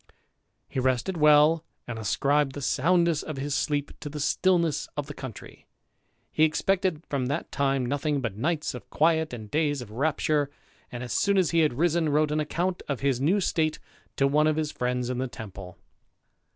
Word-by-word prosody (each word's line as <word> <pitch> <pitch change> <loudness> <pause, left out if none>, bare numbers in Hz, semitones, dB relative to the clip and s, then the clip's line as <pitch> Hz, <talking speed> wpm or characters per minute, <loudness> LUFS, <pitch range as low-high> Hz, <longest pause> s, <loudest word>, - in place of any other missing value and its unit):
He - - -3
rested 130 +7 0
well, 150 +1 +5 0.2
and 115 -2 -5
ascribed 140 +6 +1
the 145 - -5
soundness 170 +3 +2
of 155 -3 -6
his 140 +1 -3
sleep 145 0 -1
to 145 - -6
the 150 +1 -6
stillness 170 +1 +1
of 145 - -2
the 145 - -8
country. 120 -8 -10 0.6
He 155 - +2
expected 180 +1 +1
from 135 -3 -1
that 145 +5 -3
time 135 -2 +1
nothing 145 +3 -1
but 115 -7 -3
nights 155 +7 -1
of - - -10
quiet 160 0 +2
and 110 -4 -8
days 150 -2 +1
of 120 -4 -9
rapture, 145 +3 0 0.4
and, 120 0 -5
as 125 - -4
soon 200 -1 +2
as 185 -4 +3
he 170 - +3
had 155 -6 +2
risen, 165 +1 +2
wrote 150 +1 +2
an 155 - +1
account 175 +4 -1
of 140 -3 -3
his 135 -2 +1
new 175 +9 +3
state 160 -4 0 0.4
to 135 - +2
one 150 +2 +3
of 155 - +2
his 155 -1 -1
friends 125 0 -2
in 125 - -3
the 130 - -1
Temple. 100 -6 -9
145 Hz, 190 wpm, -27 LUFS, 130-160 Hz, 0.6 s, well